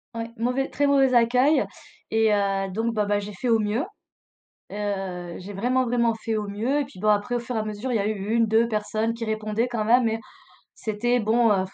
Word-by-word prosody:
Ouais, 230 0 -4
mauvais 250 +4 0
très 285 0 +1
mauvais 270 -2 +4
accueil 250 +5 +4 0.4
et 220 -1 +3
heu, 195 -1 0
donc 225 +4 -1
bon, 210 -2 +1
bah, 205 0 +1
j'ai 205 0 -7
fait 240 +6 -3
au 225 -1 +4
mieux, 215 +6 0 0.9
heu, 190 -4 -4
j'ai 200 +2 -8
vraiment, 250 +6 +1
vraiment 235 -1 +2
fait 220 0 -3
au 210 -1 -3
mieux 235 +9 0
et - - 0
puis 265 -9 -13
bon, 215 - 0
après, 210 +4 +2
au - - +1
fur 240 0 -5
et - - +1
à - - -2
mesure, 215 +4 -4
il - - +2
y 200 - 0
eu 210 0 -2
1-2 230 0 +3
personnes 215 +1 -1
qui 230 0 -5
répondaient 220 +2 -1
quand 230 -3 -2
même 245 +2 +5
mais 225 0 0 0.5
c'était 240 +3 0
bon, 225 +1 +3
heu, 190 -2 +2
220 Hz, 220 wpm, -25 LUFS, 205-240 Hz, 0.9 s, même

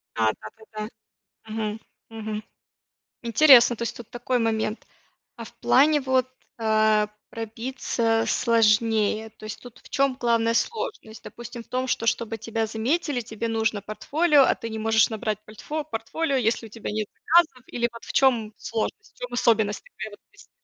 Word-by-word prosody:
Да, 110 -1 +3
да, 110 - -8
да, 220 - -17
да. 215 0 -3 0.7
Мгм, 215 -1 -3 0.3
мгм. 220 -1 -5 0.8
Интересно, 240 0 +7
то 235 - -6
есть 235 - -3
тут 240 - -11
такой 245 +1 -1
момент, 220 -1 -1 0.5
а - - -8
в - - -12
плане 295 +2 +4
вот, 260 -1 +1 0.3
э, 215 -1 +3 0.2
пробиться 230 0 -1
сложнее, 220 -1 +2
то 220 - -19
есть 215 - -6
тут 245 -1 -13
в - - -18
чём 275 -2 +1
главная 230 -1 +2
сложность? 435 - -3
Допустим, 240 0 -9
в - - -30
том, 255 +1 -2
что, 230 - -1
чтобы 230 -1 0
тебя 225 +1 -2
заметили, 250 +6 -1
тебе 220 0 -5
нужно 220 -2 0
портфолио, 290 - +3
а - - +3
ты 230 - -6
не 220 0 -5
можешь 220 0 +3
набрать 215 -1 -3
польтфо 295 +9 -5
портфолио, 280 +3 -2
если 230 -1 0
у - - -17
тебя 220 0 -6
нет 215 0 -2
заказов, 320 -7 +2
или 235 0 -1
вот 230 -1 -12
в - - -7
чём 235 -5 +3
сложность, 230 - -4
в - - -33
чём - - -6
особенность 220 -3 +2
такая - - -8
вот - - -13
есть? 410 - -19
230 Hz, 170 wpm, -25 LUFS, 220-255 Hz, 0.8 s, Интересно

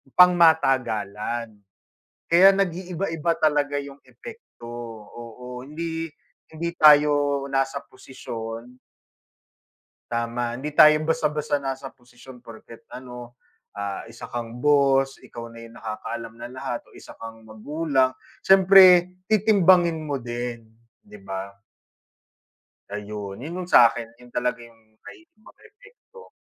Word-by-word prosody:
pangmatagalan. 120 - +2 0.7
Kaya 175 +3 +7
nag-iiba-iba 175 -3 -2
talaga 145 -2 +1
'yong 140 0 -7
epekto. 460 - -13 0.5
Oo, 125 +1 -10
hindi 165 +2 -5 0.4
hindi 165 +2 -4
tayo 145 -2 +5
nasa 135 +1 -1
posisyon 120 -1 -9 1.3
Tama, 120 0 -2
hindi 135 +5 -5
tayo 155 +1 +6
basta-basta 150 -2 -1
nasa 135 -1 -5
posisyon 125 +1 -16
porket, 115 -1 -14
ano, 125 -1 -10 0.4
ah, 100 -1 -5
isa 115 +1 -11
kang 120 0 -6
boss, 135 -2 +3
ikaw 115 -1 -10
na 115 0 -12
'yong 115 0 -15
nakakaalam 115 +1 -6
ng 120 +1 -9
lahat 130 - -4
o - - -23
isa - - -14
kang 115 0 -10
magulang. 130 +4 -1 0.3
Siyempre 185 -2 +6
titimbangin 185 -6 +3
mo 140 -3 -3
din, 120 -1 -6 0.3
'di 105 0 -15
ba? 95 +1 -7 1.4
Ayun, 105 0 -7
'yon 160 +6 -7
'yong - - -16
sa 120 -1 +8
'kin, 115 - -6 0.2
'yon 125 - -16
talaga 125 0 -2
'yong 115 -1 -16 0.2
may 390 - -13
mga 330 -10 -22
epekto. 475 +1 -18
135 Hz, 115 wpm, -23 LUFS, 115-160 Hz, 1.4 s, sa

